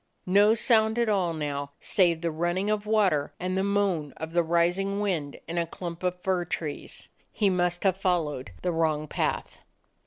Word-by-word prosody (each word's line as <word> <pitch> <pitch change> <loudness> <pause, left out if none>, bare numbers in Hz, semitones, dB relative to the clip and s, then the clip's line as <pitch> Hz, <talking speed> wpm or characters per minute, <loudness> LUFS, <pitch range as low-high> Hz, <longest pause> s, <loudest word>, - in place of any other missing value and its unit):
No 205 +4 +5
sound 220 -1 +3
at 235 -2 +2
all 190 -5 +1
now, 145 -3 -4
save 170 -4 +2
the 170 -1 -1
running 175 +6 -1
of 210 0 -1
water 195 -10 +2
and 185 +1 -2
the 190 - +1
moan 195 -8 0
of 160 +1 -6
the 175 - +4
rising 175 +4 +1
wind 170 -9 -2
in 170 +1 -2
a 170 - -1
clump 170 0 -7
of 180 -1 -1
fir 185 -2 +1
trees. 160 -3 -5 0.2
He 205 -3 +2
must 175 -1 0
have 190 -2 +2
followed 165 - -1
the 180 - +1
wrong 155 -2 0
path. - - -2
175 Hz, 180 wpm, -27 LUFS, 160-195 Hz, 0.2 s, No